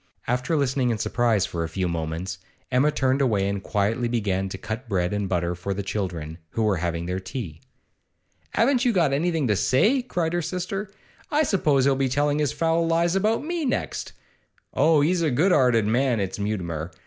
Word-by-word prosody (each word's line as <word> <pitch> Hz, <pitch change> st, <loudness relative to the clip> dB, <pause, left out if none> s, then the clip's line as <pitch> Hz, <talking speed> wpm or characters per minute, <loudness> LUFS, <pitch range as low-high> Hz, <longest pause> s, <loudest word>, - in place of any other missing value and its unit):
After 125 Hz, +6 st, 0 dB
listening 135 Hz, -3 st, +1 dB
in 115 Hz, -, 0 dB
surprise 110 Hz, -3 st, +1 dB
for 85 Hz, -3 st, -3 dB
a 80 Hz, -, -4 dB
few 95 Hz, +2 st, -2 dB
moments, 85 Hz, +2 st, -4 dB, 0.3 s
Emma 130 Hz, +4 st, +4 dB
turned 135 Hz, -2 st, +1 dB
away 105 Hz, -7 st, +2 dB
and 100 Hz, 0 st, -2 dB
quietly 110 Hz, +4 st, 0 dB
began 100 Hz, -5 st, -1 dB
to 95 Hz, -, -6 dB
cut 110 Hz, +5 st, -6 dB
bread 90 Hz, -2 st, 0 dB
and 105 Hz, -2 st, -2 dB
butter 85 Hz, -1 st, 0 dB
for 90 Hz, +3 st, -4 dB
the 100 Hz, -, -3 dB
children, 90 Hz, -5 st, -4 dB
who 115 Hz, -, -1 dB
were 105 Hz, -3 st, +2 dB
having 85 Hz, 0 st, -2 dB
their 90 Hz, +1 st, -2 dB
tea. 95 Hz, -, -7 dB, 0.9 s
'Haven't 250 Hz, +2 st, +3 dB
you 245 Hz, -3 st, +3 dB
got 170 Hz, -8 st, +2 dB
anything 160 Hz, -1 st, +1 dB
to 105 Hz, -, +2 dB
say?' 215 Hz, -, +3 dB
cried 175 Hz, -9 st, -2 dB
her 175 Hz, -, +1 dB
sister. 185 Hz, +4 st, -4 dB, 0.4 s
'I 305 Hz, +1 st, +2 dB
suppose 150 Hz, -, +2 dB
he'll 140 Hz, -1 st, +3 dB
be 135 Hz, 0 st, 0 dB
telling 145 Hz, +3 st, +1 dB
his 150 Hz, -3 st, +1 dB
foul 165 Hz, 0 st, +1 dB
lies 170 Hz, +2 st, +2 dB
about 215 Hz, +6 st, +1 dB
me 340 Hz, 0 st, -2 dB
next. 265 Hz, -, -2 dB, 0.6 s
Oh, 155 Hz, -2 st, +4 dB
he's 170 Hz, +4 st, +2 dB
a 160 Hz, -, +2 dB
good 155 Hz, +9 st, +2 dB
'earted 125 Hz, -8 st, +4 dB
man, 120 Hz, +2 st, +2 dB
is 95 Hz, +1 st, -3 dB
Mutimer! 85 Hz, -6 st, -3 dB
125 Hz, 195 wpm, -24 LUFS, -, 0.9 s, Emma